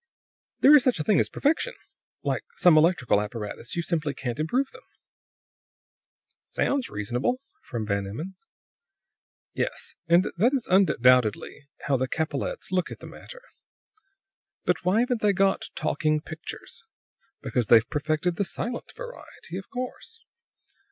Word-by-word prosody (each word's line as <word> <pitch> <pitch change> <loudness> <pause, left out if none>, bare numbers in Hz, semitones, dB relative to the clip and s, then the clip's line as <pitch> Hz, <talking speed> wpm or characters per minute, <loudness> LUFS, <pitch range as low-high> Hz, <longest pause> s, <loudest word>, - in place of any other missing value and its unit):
"There 285 - +8
is 295 -4 +8
such 255 -9 +2
a - - 0
thing 205 +5 +3
as - - +1
perfection. 325 - 0 0.5
Like - - 0
some 175 -3 +6
electrical 155 - +4
apparatus; 105 +1 -6
you 170 - -1
simply 160 -4 -1
can't 125 +1 -4
improve 250 - 0
them." - - -14 1.7
"Sounds 275 -3 0
reasonable," 120 - -1 0.2
from 115 - -5
Van 100 -1 -1
Emmon. 155 - -6 1.2
"Yes. - - -2
And 170 +2 +5
that 235 +9 +3
is 255 - -1
undoubtedly 125 - +3 0.2
how 140 -2 +2
the 130 +1 -1
Capellettes 185 - -3
look 180 -2 0
at - - -8
the - - -12
matter. - - -11 1.4
"Why 185 +5 +3
haven't 245 -2 0
they 205 -1 +3
got 195 0 +2
talking 155 0 0
pictures? 155 +1 -9 0.6
Because 120 -4 -1
they've 115 0 +6
perfected 155 +3 -1
the 200 - +2
silent 240 +5 -4
variety, - - -10
of 190 +1 -7
course. 260 - -7
170 Hz, 135 wpm, -26 LUFS, -, 1.7 s, There